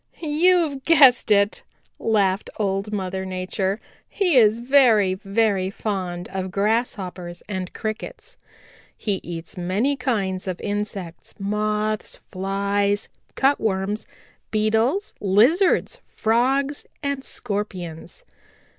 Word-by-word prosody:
"You've 315 -2 +2
guessed 275 -8 +6
it," 200 0 +3 0.4
laughed 200 -3 +1
Old 195 0 -1
Mother 190 -2 -3
Nature. 190 +2 -2 0.3
"He 365 -6 +1
is 220 -3 +6
very, 235 -6 +4
very 195 0 0
fond 185 -4 -4
of 190 0 -4
Grasshoppers 195 -4 -2
and 190 -3 -4
Crickets. 240 - -6 0.6
He 200 -3 -1
eats 165 0 -7
many 200 +11 0
kinds 200 -8 -2
of 185 -2 -3
insects, 205 -4 -4
Moths, 210 +1 -1 0.2
Flies, 200 +2 0 0.3
Cutworms, 210 -6 0 0.4
Beetles, 225 - +1
Lizards, 275 - +3
Frogs 265 +6 0 0.2
and 280 -1 -2
Scorpions. 200 - -5
210 Hz, 95 wpm, -23 LUFS, 190-245 Hz, 0.6 s, guessed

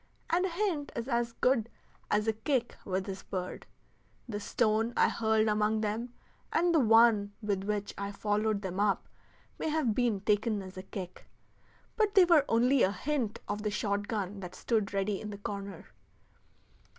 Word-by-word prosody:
And 360 +3 +3
a - - -4
hint 345 -5 -1
is 235 +1 -3
as 235 -2 0
good 235 -3 +1 0.4
as 210 +1 +1
a 220 - +3
kick 245 +2 -1
with 190 -1 -1
this 190 -1 -6
bird. 185 -1 -5 0.6
The 210 -3 -4
stone 220 +2 +1
I - - +5
hurled 220 -1 +2
among 215 +1 +1
them, 220 +3 -2 0.4
and 345 +1 +2
the 320 - +5
one 225 -4 +5
with 200 -2 -1
which 205 -1 -2
I 200 0 -3
followed 210 0 0
them 190 0 -4
up, 205 -1 +1 0.5
may - - -1
have 300 -8 +1
been 230 -4 +1
taken 210 0 +1
as 185 0 -10
a 185 - -6
kick; 185 -1 -8 0.7
but 425 -2 +2
they 380 -2 +8
were 330 -5 +5
only 245 +3 +4
a 190 - +4
hint 255 -2 -2
of 205 +1 -3
the 210 - -1
shot 205 0 -1
gun 205 -2 -3
that 180 -2 -8
stood 215 -4 0
ready 195 0 -1
in 215 - -6
the 205 - -6
corner. 200 -2 -6
215 Hz, 175 wpm, -31 LUFS, 200-240 Hz, 0.7 s, they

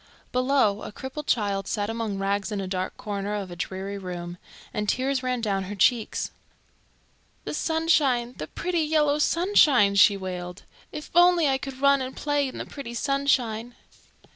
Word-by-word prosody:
Below, 250 -5 +2
a - - -7
crippled 265 +6 -7
child 200 -4 0
sat 205 -2 -1
among 225 -2 -3
rags 200 +2 -1
in 205 - -2
a 195 - -3
dark 185 0 -3
corner 205 0 -3
of 195 -3 -5
a - - -7
dreary 195 +3 -5
room, 175 -1 -6 0.3
and 210 -1 -2
tears 265 +1 0
ran 250 -2 -1
down 195 -3 -1
her 205 +3 -6
cheeks. 225 +3 +1 1.1
"The - - -5
sunshine, 300 -7 +1
the 155 - -4
pretty 350 - -2
yellow 300 -1 +2
sunshine!" 300 - +4
she 200 0 +6
wailed. 180 -1 -6 0.3
"If 300 - -8
only 350 -2 +5
I 265 -1 +1
could 270 -1 -7
run 280 -1 +4
and 260 0 -5
play 290 -1 0
in 260 - -8
the - - -5
pretty 240 -4 -8
sunshine!" 245 -4 0
235 Hz, 165 wpm, -25 LUFS, 200-280 Hz, 1.1 s, she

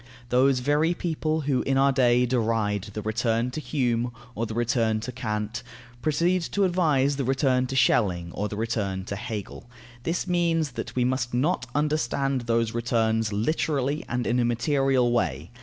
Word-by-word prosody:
Those 125 +1 +3
very 150 +6 +2
people 160 -2 -1
who 140 -3 0
in 135 0 0
our 140 +1 +4
day 125 -2 +3
deride 110 -4 0
the 105 - -4
"return 115 +2 0
to 155 - -5
Hume" 120 -5 0 0.2
or 115 +1 -2
the 110 - -6
"return 115 -2 +1
to 120 +3 -5
Kant," 110 -2 -3 0.4
proceed 170 +5 +1
to 200 - +2
advise 150 -7 +2
the 140 - -1
"return 130 -1 +1
to 135 - -4
Schelling," 90 -9 +2
or 105 +1 -2
the 105 - -6
"return 105 -4 -2
to 100 - -4
Hegel." 110 +1 -6 0.3
This 165 +7 -2
means 165 -4 +1
that - - -6
we 125 -1 +2
must 125 -1 -1
not 155 +9 0
understand 140 -3 0
those 115 -1 +1
"returns" 115 -2 0
literally 140 +5 0
and 120 0 -1
in 120 +1 +1
a - - +3
material 130 +1 +2
way. 80 - -1
125 Hz, 170 wpm, -26 LUFS, 115-140 Hz, 0.4 s, our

